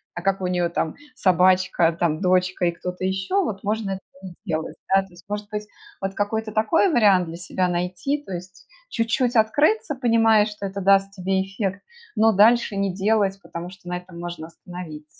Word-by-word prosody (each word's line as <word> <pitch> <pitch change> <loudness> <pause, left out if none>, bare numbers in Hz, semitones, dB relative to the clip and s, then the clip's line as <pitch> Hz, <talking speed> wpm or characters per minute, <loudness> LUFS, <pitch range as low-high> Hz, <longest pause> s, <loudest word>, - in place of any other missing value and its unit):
а 175 - -5
как 195 +1 0
у 185 - -1
нее 175 -1 0
там 165 -1 -2 0.2
собачка, 185 -4 +3
там, 160 -1 0
дочка 185 -1 +2
и 170 - +3
кто-то 180 +2 -6
еще 190 - 0
вот- 195 - -4
можно 210 -1 -1
этого 190 0 -4 0.2
не 185 -2 -9
сделать. 160 -4 -3 0.2
Да, 195 - +6
то 195 - -12
есть, 175 -1 -17
может 205 0 -5
быть, 210 0 -4 0.4
вот 195 0 -2
какой-то 215 +2 -2
такой 220 - +3
вариант 200 -6 +5
для 165 - -7
себя 180 +1 -1
найти, 180 +12 -2
то 195 - -11
есть 185 +1 -8 0.2
чуть-чуть 235 - 0
открыться, 290 - +2
понимая, 225 -4 +4
что 210 -2 -5
это 195 +1 -5
даст 195 +1 +4
тебе 190 0 0
эффект, 195 0 -3 0.3
но 220 0 +5
дальше 220 +2 +4
не 195 -2 0
делать, 195 0 +1
потому 170 -1 -7
что 185 -1 -12
на 180 - -2
этом 180 -1 -11
можно 170 -2 -6
остановиться. 165 -3 -9
195 Hz, 190 wpm, -23 LUFS, 180-215 Hz, 0.4 s, Да